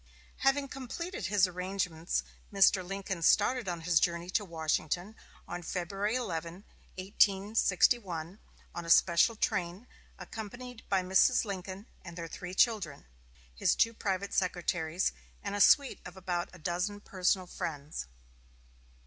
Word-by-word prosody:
Having 275 Hz, +1 st, +2 dB
completed 305 Hz, +9 st, -5 dB
his 200 Hz, -1 st, +4 dB
arrangements, 180 Hz, -2 st, -2 dB, 0.3 s
Mr. 195 Hz, -1 st, +5 dB
Lincoln 195 Hz, -1 st, -4 dB
started 210 Hz, +5 st, +3 dB
on 170 Hz, -1 st, -4 dB
his 165 Hz, -1 st, +3 dB
journey 170 Hz, 0 st, -1 dB
to 205 Hz, -, +1 dB
Washington 170 Hz, +3 st, -2 dB, 0.3 s
on 175 Hz, 0 st, -5 dB
February 195 Hz, +5 st, -2 dB
11, 175 Hz, -5 st, -4 dB, 0.3 s
1861, 195 Hz, -2 st, +2 dB, 0.3 s
on 175 Hz, -, -5 dB
a 165 Hz, -, -7 dB
special 170 Hz, +7 st, +5 dB
train, 180 Hz, 0 st, -2 dB, 0.3 s
accompanied 245 Hz, +2 st, -8 dB
by 190 Hz, -2 st, +2 dB
Mrs. 190 Hz, +7 st, +4 dB
Lincoln 195 Hz, 0 st, -6 dB, 0.2 s
and 170 Hz, -1 st, -9 dB
their 170 Hz, -1 st, -5 dB
three 180 Hz, +2 st, -7 dB
children, 195 Hz, -, +1 dB, 0.5 s
his -, -, +2 dB
two 230 Hz, -, +3 dB
private 200 Hz, -2 st, -2 dB
secretaries, 175 Hz, -2 st, 0 dB, 0.3 s
and 200 Hz, -, -3 dB
a 205 Hz, -, 0 dB
suite 280 Hz, +4 st, +5 dB
of 180 Hz, +1 st, -10 dB
about 175 Hz, -2 st, -2 dB
a -, -, -13 dB
dozen 180 Hz, +5 st, -2 dB
personal 185 Hz, -1 st, 0 dB
friends. 150 Hz, -, -5 dB
185 Hz, 130 wpm, -31 LUFS, 175-205 Hz, 0.5 s, Mr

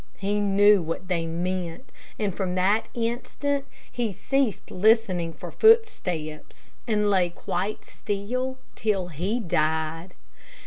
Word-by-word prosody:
He 205 Hz, +1 st, 0 dB
knew 205 Hz, 0 st, +5 dB
what 165 Hz, +3 st, -5 dB
they 170 Hz, -2 st, 0 dB
meant, 175 Hz, +4 st, -3 dB, 0.3 s
and 205 Hz, -3 st, -1 dB
from 185 Hz, -1 st, -2 dB
that 200 Hz, +4 st, +2 dB
instant 255 Hz, +4 st, -2 dB, 0.3 s
he 235 Hz, -3 st, -1 dB
ceased 270 Hz, +3 st, -1 dB
listening 190 Hz, -4 st, +3 dB
for -, -, -9 dB
footsteps, 180 Hz, -, +1 dB
and 210 Hz, -2 st, +2 dB
lay 185 Hz, -3 st, +3 dB
quite 185 Hz, +4 st, -3 dB
still 250 Hz, +6 st, -3 dB, 0.2 s
till 195 Hz, -5 st, 0 dB
he 185 Hz, -, -2 dB
died. 160 Hz, -1 st, -1 dB
195 Hz, 120 wpm, -26 LUFS, 175-225 Hz, 0.3 s, knew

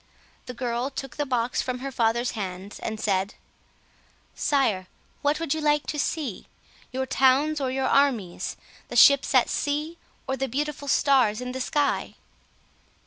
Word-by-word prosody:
The 250 Hz, -, -6 dB
girl 240 Hz, +1 st, -2 dB
took 270 Hz, -1 st, -7 dB
the 290 Hz, -1 st, -1 dB
box 245 Hz, -1 st, 0 dB
from 255 Hz, -1 st, -3 dB
her 270 Hz, +2 st, -5 dB
father's 235 Hz, 0 st, +1 dB
hands, 195 Hz, -1 st, -6 dB
and 220 Hz, -1 st, -4 dB
said— 195 Hz, -2 st, 0 dB, 1.0 s
"Sire, 220 Hz, -10 st, +1 dB, 0.3 s
what 290 Hz, +1 st, +1 dB
would 330 Hz, -4 st, 0 dB
you 315 Hz, -, -3 dB
like 295 Hz, 0 st, +2 dB
to 295 Hz, -, -3 dB
see? 285 Hz, -, -3 dB, 0.4 s
Your 260 Hz, +1 st, -2 dB
towns 270 Hz, +4 st, +3 dB
or 265 Hz, -, 0 dB
your 265 Hz, +1 st, -1 dB
armies; 250 Hz, -11 st, +1 dB, 0.3 s
the -, -, -7 dB
ships 280 Hz, -1 st, +6 dB
at 255 Hz, -, +5 dB
sea, 300 Hz, +3 st, -2 dB, 0.3 s
or 265 Hz, -, 0 dB
the 270 Hz, +1 st, -2 dB
beautiful 290 Hz, +3 st, -3 dB
stars 265 Hz, -7 st, +3 dB
in 250 Hz, 0 st, -4 dB
the 260 Hz, +1 st, -4 dB
sky?" 290 Hz, +2 st, 0 dB
265 Hz, 155 wpm, -25 LUFS, 235-285 Hz, 1.0 s, ships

